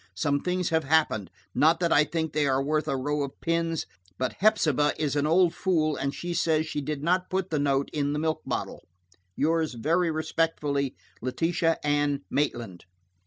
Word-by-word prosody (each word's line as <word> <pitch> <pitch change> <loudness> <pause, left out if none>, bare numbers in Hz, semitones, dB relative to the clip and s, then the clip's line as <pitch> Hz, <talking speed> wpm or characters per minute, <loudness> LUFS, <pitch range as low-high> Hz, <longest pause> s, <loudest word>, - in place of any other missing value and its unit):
Some 140 +10 +1
things 180 +2 -1
have 160 -1 +1
happened, 135 - +1 0.2
not 160 +5 +4
that 170 -2 +2
I 150 - +5
think 160 -1 -3
they 150 -1 +2
are 135 0 +1
worth 155 +2 0
a 135 - 0
row 145 +3 -1
of 140 -1 -5
pins, 165 -1 -1 0.3
but 130 - -1
Hepsibah 155 -9 +3
is 150 -2 -1
an 145 +1 +1
old 170 +1 +4
fool, 155 -6 +1
and 140 - -2
she 175 +4 -5
says 160 -2 +1
she 150 -2 -3
did 145 0 -4
not 180 +2 +1
put 190 -1 -2
the 155 - +1
note 140 -1 +1
in 145 -1 0
the - - -1
milk 155 +1 -1
bottle. - - -4 0.5
"Yours 160 -2 +1
very 165 +9 +1
respectfully, 155 -3 -1 0.3
"LETITIA 165 +6 0
ANN 145 -1 +1
MAITLAND." 120 -10 -2
155 Hz, 180 wpm, -27 LUFS, 140-165 Hz, 0.5 s, I